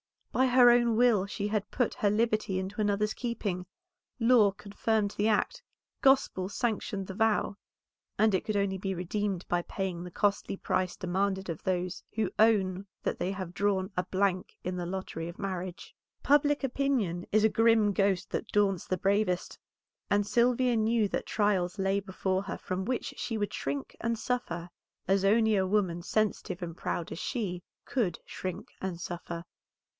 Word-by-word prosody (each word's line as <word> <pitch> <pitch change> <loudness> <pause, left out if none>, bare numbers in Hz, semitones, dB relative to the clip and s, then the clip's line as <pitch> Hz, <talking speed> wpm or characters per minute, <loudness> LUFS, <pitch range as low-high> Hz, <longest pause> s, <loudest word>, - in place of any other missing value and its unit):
By 260 - +3
her 245 -1 +7
own 240 -1 +4
will 225 -5 +4
she 205 +1 -3
had 210 -1 -1
put 245 -3 0
her 205 - +2
liberty 215 -2 +1
into 190 +3 -3
another's 210 +1 +1
keeping; 205 -7 -3 0.5
law 230 -4 +5
confirmed 205 +1 -1
the 210 +1 0
act, 215 -2 +1 0.4
gospel 265 -9 +3
sanctioned 205 -3 -2
the 190 - -6
vow, 215 -1 +1 0.6
and 220 -1 +4
it 190 - +1
could 215 - -1
only 200 -1 +1
be 195 0 -2
redeemed 185 +1 -2
by 175 0 +1
paying 180 -1 -4
the 180 - -7
costly 200 +2 0
price 185 -1 -1
demanded 190 +1 -1
of 165 - -4
those 180 -1 -1
who 215 -4 0
own 200 -3 +3 0.2
that - - -2
they 185 - -1
have 185 -3 -6
drawn 195 0 0
a 180 - +1
blank 190 -1 0
in 180 0 -2
the 175 - -3
lottery 180 -3 -4
of 170 - -8
marriage. 185 -2 -5 0.3
Public 290 0 +3
opinion 245 -10 0
is 215 +1 +4
a 220 - +6
grim 225 -2 +4
ghost 195 -1 +1
that - - -2
daunts 200 -3 +1
the 185 - 0
bravest, 195 -1 0 0.5
and 205 0 +3
Sylvia 245 +2 +3
knew 220 -1 +2
that - - -3
trials 205 -3 +1
lay 195 0 +1
before 190 -1 -1
her - - -5
from 185 +1 -3
which 255 0 -2
she 225 - -2
would 205 -1 -2
shrink 140 0 -4
and 230 0 -1
suffer, 195 -8 -3 0.4
as 195 +1 +3
only 220 +1 +4
a 190 -1 +2
woman 185 -4 +1
sensitive 195 -2 -1
and 165 -2 -5
proud 170 - -3
as - - -5
she 195 -8 -3 0.2
could 210 -11 0
shrink 185 -2 -6
and 185 -3 -3
suffer. 170 -1 -5
200 Hz, 170 wpm, -30 LUFS, 185-220 Hz, 0.6 s, her